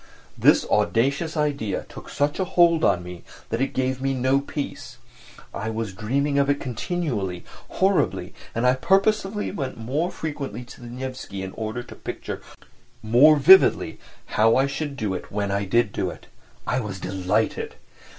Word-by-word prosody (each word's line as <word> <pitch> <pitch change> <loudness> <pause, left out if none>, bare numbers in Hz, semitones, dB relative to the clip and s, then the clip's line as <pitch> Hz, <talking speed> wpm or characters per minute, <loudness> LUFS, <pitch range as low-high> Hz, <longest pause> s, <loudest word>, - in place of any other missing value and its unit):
This - - +4
audacious 140 - +1
idea 145 -9 -1
took - - -11
such 145 +4 -1
a - - +2
hold 170 -3 +3
on 90 -3 +3
me 90 -1 -9 0.3
that 115 +3 -1
it 135 - +3
gave 130 0 -1
me 135 0 0
no 130 +2 +2
peace. 140 +1 -6 0.6
I 110 +2 -3
was 110 -3 -3
dreaming 140 +8 0
of 140 0 +2
it 140 0 +2
continually, 120 - -3 0.2
horribly, 95 - +1 0.2
and 115 +2 0
I 125 - +5
purposely 195 +8 +1
went 140 -9 -4
more 140 +10 -1
frequently 145 -7 -5
to 125 - -14
the 120 - -9
Nevsky 125 -5 -6
in 95 - -5
order 110 +3 -4
to - - -12
picture - - -6 0.6
more 125 +8 +6
vividly 170 +7 +6 0.3
how 115 +1 +3
I 135 - +4
should 140 0 -4
do 105 -7 -1
it 90 - -6
when 100 -1 -1
I 100 0 0
did 115 +2 +2
do - - -2
it. - - -11 0.4
I 125 - 0
was 100 -5 -5
delighted. 95 0 -1
130 Hz, 165 wpm, -24 LUFS, 110-145 Hz, 0.6 s, more